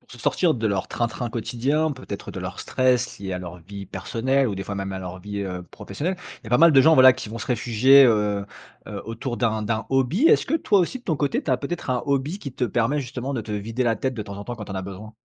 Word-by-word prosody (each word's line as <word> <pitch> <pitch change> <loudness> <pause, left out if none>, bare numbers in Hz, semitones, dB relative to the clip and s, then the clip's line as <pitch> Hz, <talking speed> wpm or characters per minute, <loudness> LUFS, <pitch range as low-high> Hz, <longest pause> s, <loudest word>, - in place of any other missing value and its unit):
Pour - - -28
se 125 - -12
sortir 170 +6 +2
de 115 -2 -1
leur 100 -3 -1
train-train 120 +1 -2
quotidien, 135 +7 0
peut-être 130 -7 -7
de - - -7
leur - - -6
stress 125 -1 +1
lié 95 -1 -5
à 90 - -2
leur 90 -1 -8
vie 100 +3 -9
personnelle 130 +6 0
ou 105 - -3
des 95 - -4
fois, 100 - -5
même, 95 0 -4
à 95 - -4
leur 90 0 -7
vie, 100 +2 -5
heu, 90 -2 -4
professionnelle, 145 - -5 0.2
il - - -33
y - - -11
a - - -11
pas 125 - +4
mal 170 0 +7
de 135 - +7
gens, 160 +4 +6
voilà, 130 -2 +8
qui 130 -4 -7
vont 115 - -6
se - - -6
réfugier, 125 +3 +5
heu, 105 -4 +2 0.4
heu, 105 -2 -6
autour 120 +2 -4
d'un 110 -3 0
d'un 110 +1 -2
hobby. 135 - +2
Est-ce - - +5
que 295 - 0
toi 215 -11 +3
aussi 180 +9 -1
de 245 - -23
ton 160 - 0
côté, 140 -1 0
tu - - -3
as 130 - +4
peut-être 140 +6 -5
un 125 -1 0
hobby 140 +6 -1
qui 140 -10 -7
te 130 - -1
permet 120 +5 +1
justement 130 +1 -5
de 120 - -1
te 110 -1 -7
vider 110 +4 -2
la 115 -2 +1
tête 130 +4 -2
de 110 - -4
temps 100 -1 -8
en 100 - -7
temps 120 - -5
quand 105 - -7
tu - - -7
en - - -6
as 95 - -3
besoin? 100 +3 -9
120 Hz, 285 wpm, -24 LUFS, 100-135 Hz, 0.4 s, voilà